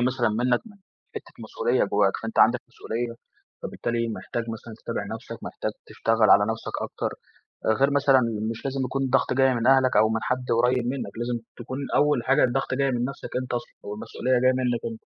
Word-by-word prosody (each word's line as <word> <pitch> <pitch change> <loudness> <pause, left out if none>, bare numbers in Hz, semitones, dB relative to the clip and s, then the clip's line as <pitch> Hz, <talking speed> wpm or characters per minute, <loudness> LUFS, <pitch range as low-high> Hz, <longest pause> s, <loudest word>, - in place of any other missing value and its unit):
مثلًا 125 -1 +2
منّك 120 +3 +1
من 210 -2 -14 0.4
حتة - - -8
مسؤولية - - 0
جوّاك، - - +2
فأنت - - -4
عندك - - +5
مسؤولية 115 +1 -4 0.5
فبالتالي 115 0 -2
محتاج 115 +1 -4
مثلًا 115 -1 -7
تتابع - - -3
نفْسك، - - -8
محتاج - - -4 0.2
تشتغل 115 -2 +2
على 100 - +7
نفْسك 115 - -6
أكتر. - - -3 0.6
آآ 110 - +4
غير 135 +1 +4
مثلًا 140 -1 +5 0.3
مش 115 +3 -8
لازم 135 0 -2
يكون 135 +2 -2
الضغط 130 0 +2
جاي 135 0 +3
من 120 0 0
أهلك 130 -1 +5
أو 110 - +5
من 110 0 0
حد 125 0 -1 0.2
قريب 125 -1 +2
منّك، 135 +1 -3
لازم 120 0 -2 0.2
تكون 130 - -6 0.2
أول 145 -5 +3
حاجة 135 +3 +4
الضغط 130 +1 0
جاي 135 +1 +1
من 120 -1 0
نفْسك 140 +1 -6
أنت 130 - -5
أصلًا، 120 0 -4
أو 100 - -4
المسؤوليّة 125 +4 0
جايّة 130 0 +4
منّك 125 -2 0
أنت. 110 - -11
125 Hz, 195 wpm, -25 LUFS, 115-130 Hz, 0.6 s, على